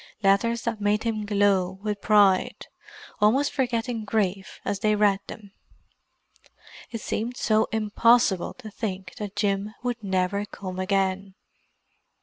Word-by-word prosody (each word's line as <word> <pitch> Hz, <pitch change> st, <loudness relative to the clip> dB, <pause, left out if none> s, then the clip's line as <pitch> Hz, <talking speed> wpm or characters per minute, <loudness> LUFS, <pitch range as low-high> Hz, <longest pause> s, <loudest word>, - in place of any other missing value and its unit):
Letters 215 Hz, +4 st, +3 dB
that 230 Hz, -3 st, -3 dB
made 205 Hz, +1 st, +1 dB
him 215 Hz, -3 st, -2 dB
glow 200 Hz, -3 st, +2 dB
with 210 Hz, -1 st, -3 dB
pride—almost 215 Hz, -, +1 dB
forgetting 240 Hz, -3 st, -1 dB
grief 200 Hz, -3 st, -2 dB
as 200 Hz, -1 st, -2 dB
they 215 Hz, +1 st, +2 dB
read 205 Hz, -2 st, +3 dB
them. 205 Hz, -2 st, -10 dB, 1.4 s
It 230 Hz, -2 st, -6 dB
seemed 235 Hz, +4 st, -3 dB
so 220 Hz, 0 st, +2 dB
impossible 220 Hz, -2 st, +2 dB
to 225 Hz, -4 st, -10 dB
think 195 Hz, -4 st, -5 dB
that 210 Hz, -3 st, -6 dB
Jim 205 Hz, +1 st, -1 dB
would 245 Hz, -2 st, -3 dB
never 190 Hz, +1 st, 0 dB
come 185 Hz, -2 st, -7 dB
again. 190 Hz, 0 st, -1 dB
210 Hz, 125 wpm, -25 LUFS, 195-225 Hz, 1.4 s, Letters